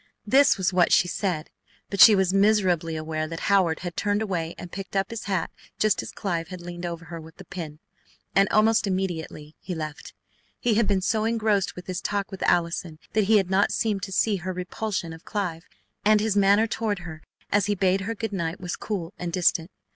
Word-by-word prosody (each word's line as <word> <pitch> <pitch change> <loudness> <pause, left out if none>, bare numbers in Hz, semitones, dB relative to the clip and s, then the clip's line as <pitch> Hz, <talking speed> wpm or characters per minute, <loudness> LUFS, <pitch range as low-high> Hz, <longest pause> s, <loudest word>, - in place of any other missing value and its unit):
This 275 +5 +5
was 190 -1 0
what 180 -1 +3
she 180 - +5
said, 175 -4 -2 0.4
but 200 - +2
she 220 - +10
was 190 -1 +2
miserably 190 -5 +2
aware 155 0 -3
that 165 0 -6
Howard 185 -5 +2
had 175 -2 -5
turned 205 +1 0
away 170 -5 -3
and 175 - -9
picked 195 +1 -7
up 195 +1 0
his 230 - -6
hat 190 -4 -1 0.3
just 215 -1 +2
as - - -8
Clive 170 -5 -3
had 185 0 -8
leaned 175 0 -6
over 170 -1 -6
her 165 0 -7
with 160 0 -13
the 190 - -11
pin, 160 -5 -7 0.6
and 195 0 +4
almost 220 0 +3
immediately 170 -5 -3
he 180 -1 -5
left. 155 -2 -7 0.4
He 240 -3 +1
had 220 0 +2
been 195 -2 +2
so 215 +3 +1
engrossed 220 -4 +1
with 180 - -9
his 185 +1 -4
talk 200 -1 -2
with 190 - -8
Allison 170 -1 0 0.2
that 215 -2 +3
he 215 +2 +5
had 190 -2 0
not 195 +2 +3
seemed 210 -3 0
to 195 0 -5
see 205 +1 +2
her 185 +1 -4
repulsion 180 -1 -3
of 160 - -12
Clive, 180 -5 -4 0.4
and 215 0 +5
his 215 -1 0
manner 200 +2 +5
toward 220 -2 -2
her 160 -2 -8 0.3
as 205 -1 +2
he 205 - +1
bade 190 0 +2
her 225 +4 -3
good 225 -1 -4
night 170 -2 -2
was 180 -1 -4
cool 185 -4 -4
and 175 -1 -3
distant. 170 -1 +2
190 Hz, 215 wpm, -25 LUFS, 170-205 Hz, 0.6 s, she